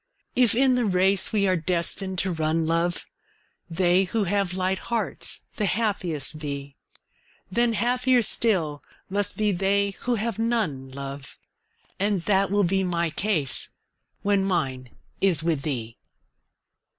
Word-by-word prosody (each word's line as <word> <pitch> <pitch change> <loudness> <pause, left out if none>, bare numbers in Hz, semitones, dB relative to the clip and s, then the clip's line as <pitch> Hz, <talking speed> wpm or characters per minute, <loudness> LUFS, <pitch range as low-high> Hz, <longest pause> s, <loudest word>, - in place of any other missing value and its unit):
If 245 -3 +4
in 260 +1 +4
the 250 -2 +1
race 190 -1 +2
we 200 -2 +2
are 185 - +3
destined 180 +3 -1
to 190 - 0
run, 160 0 0
love, 165 +2 0 0.6
They 180 +2 +3
who 215 +3 0
have 195 -1 0
light 185 0 0
hearts 235 -1 -1
the 210 - +1
happiest 180 -8 -1
be, 140 -2 -5 0.8
Then 235 +3 +2
happier 250 +2 +2
still 170 -11 +1 0.3
must 205 0 -1
be 210 -1 +2
they 200 +2 +1
who 245 0 0
have 225 0 -2
none, 215 - -1
love. 135 0 -7 0.6
And 200 -3 +1
that 195 0 +2
will 205 +1 +2
be 190 +2 +1
my 170 -2 0
case 160 -9 0 0.5
when 200 -1 +2
mine 135 -9 -1 0.3
is 175 -6 +3
with 160 -4 0
thee. 120 -6 -3
190 Hz, 140 wpm, -25 LUFS, 160-210 Hz, 0.8 s, If